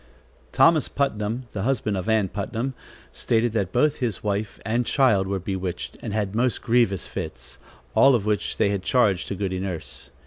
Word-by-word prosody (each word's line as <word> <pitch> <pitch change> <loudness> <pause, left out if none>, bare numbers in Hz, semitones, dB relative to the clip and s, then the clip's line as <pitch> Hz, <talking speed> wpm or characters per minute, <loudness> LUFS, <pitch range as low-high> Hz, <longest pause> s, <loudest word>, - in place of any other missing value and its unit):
Thomas 165 -3 +4
Putnam, 115 -3 -1
the 100 - -4
husband 110 -3 0
of 95 +3 -3
Ann 110 -3 +3
Putnam, 115 +7 -3 0.4
stated 115 0 +1
that 100 -5 -1
both 150 +4 +2
his 115 -8 -3
wife 105 0 -2
and 115 +2 +1
child 115 -8 +3
were 100 0 -1
bewitched 95 -1 -4
and - - -5
had 105 -2 -1
most 120 +2 0
grievous 115 -5 +2
fits, - - -7 0.3
all 135 -1 +6
of 105 -4 -1
which 105 -1 -1
they 100 -2 +2
charged 100 -2 +2
to 100 - -3
Goody 95 -1 -2
Nurse. 85 -8 -6
105 Hz, 170 wpm, -24 LUFS, 95-120 Hz, 0.4 s, all